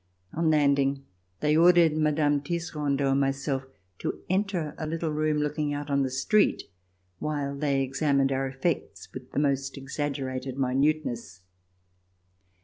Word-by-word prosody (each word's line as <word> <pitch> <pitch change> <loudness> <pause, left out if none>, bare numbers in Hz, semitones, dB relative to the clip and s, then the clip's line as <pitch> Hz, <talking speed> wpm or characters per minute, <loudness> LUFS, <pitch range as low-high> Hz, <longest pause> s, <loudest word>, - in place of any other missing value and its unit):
On 165 0 +1
landing 140 -2 +2 0.4
they 150 0 +3
ordered 170 -1 +6
Mme. 150 -1 +2
Tisserandot 145 -3 -1
and 135 - +2
myself 135 0 -1 0.3
to - - -4
enter 185 -5 0
a 155 - -3
little 165 0 -2
room 155 0 0
looking 150 0 -1
out 145 0 -5
on 140 0 +2
the 135 - 0
street, 200 +11 +2 0.6
while 145 -2 -2
they 140 -1 +1
examined 135 0 +1
our 135 0 0
effects 135 +4 -3
with 130 -1 -9
the - - -7
most 140 -1 0
exaggerated 135 -2 -4
minuteness. 130 - 0
145 Hz, 135 wpm, -27 LUFS, 135-155 Hz, 0.6 s, ordered